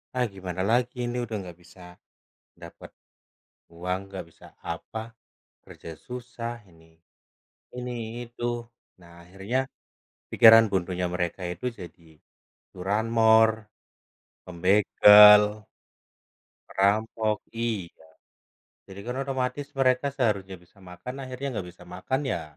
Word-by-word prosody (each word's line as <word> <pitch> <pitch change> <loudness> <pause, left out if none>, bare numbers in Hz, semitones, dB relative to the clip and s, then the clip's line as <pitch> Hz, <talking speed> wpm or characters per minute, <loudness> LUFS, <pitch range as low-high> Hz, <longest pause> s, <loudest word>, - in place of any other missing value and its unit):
ah 125 - +1
gimana 95 -1 -5
lagi 125 +1 +1
ini 120 +1 -3
udah 110 -1 -6
nggak 90 -2 -11
bisa, 90 +2 -19 0.8
dapet - - -12 0.8
uang, 90 +2 -3
nggak 95 -1 -7
bisa - - -19 0.2
apa, 85 +6 -6 0.6
kerja - - -12 0.2
susah 120 -1 -6 0.2
ini, 80 -1 -21 0.9
ini 125 0 -5 0.3
itu. 120 0 -9 0.6
Nah, 85 -1 -17
akhirnya, 95 +8 -4 0.7
pikiran 115 0 +8
buntunya 90 -1 -1
mereka 90 +1 -3
itu, 90 +7 -12 0.2
jadi 85 -1 -11 0.7
curanmor, 110 +3 +3 1.0
pembegal 105 +3 +7 1.3
perampok 110 +2 0 0.2
iya. 105 -8 -5 0.8
Jadi 95 0 -10
kan 125 +2 -5
otomatis, 130 +1 -3
mereka 130 +1 +2
seharusnya 100 -8 -1
bisa 90 +3 -25
makan, 95 +9 -9
akhirnya 130 -1 -5
nggak 90 - -9
bisa 90 - -17
makan. 95 +9 -3
Ya, 85 - -2
105 Hz, 105 wpm, -26 LUFS, 90-120 Hz, 1.3 s, pikiran